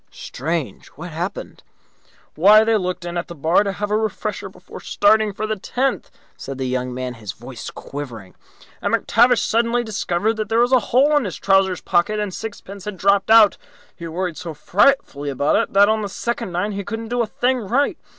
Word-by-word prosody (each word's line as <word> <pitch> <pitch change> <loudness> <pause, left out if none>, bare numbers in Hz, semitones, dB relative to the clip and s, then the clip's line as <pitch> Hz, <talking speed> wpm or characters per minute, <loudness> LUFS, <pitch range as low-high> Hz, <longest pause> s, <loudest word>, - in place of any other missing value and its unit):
"Strange! 170 - -5
What 170 +4 -8
happened?" 170 +4 -5 0.7
"Why, 210 +6 +6
they 225 0 +2
looked 185 -3 -2
in 175 0 -4
at 170 - -6
the 170 - -9
bar 160 +5 +3
to 200 - -2
have 205 +2 -4
a - - +2
refresher 220 -1 -3
before - - -12
starting 220 -7 +2
for 210 +2 -4
the 215 0 -2
tenth," 260 +6 -2 0.3
said 135 -1 -7
the 130 - -3
young 125 0 -2
man, 125 0 -4
his 110 -4 -8
voice 120 +1 -9
quivering, 120 -9 -8 0.5
"and - - +1
McTavish 240 +2 +3
suddenly 235 +1 +1
discovered 215 0 -1
that 215 -1 -3
there 225 - +1
was 240 +2 +3
a 255 - +6
hole 280 +5 +4
in 290 -5 +2
his 185 - -5
trouser 195 -2 +2
pocket 210 +5 +1
and 205 -3 -3
sixpence 200 -2 -8
had 210 -2 -5
dropped 200 +1 +2
out. 220 -2 +7 0.4
He 170 - -8
worried 175 0 -3
so 165 -3 -7
frightfully 155 - +1
about 140 +1 +1
it - - 0
that 200 +1 +6
on 220 0 +1
the 205 - -4
second 235 -2 -3
nine 180 +5 -1
he 200 0 -4
couldn't 225 +2 -6
do 245 0 0
a 230 - -1
thing 250 +4 0
right. 245 +7 0
200 Hz, 200 wpm, -21 LUFS, 170-225 Hz, 0.7 s, out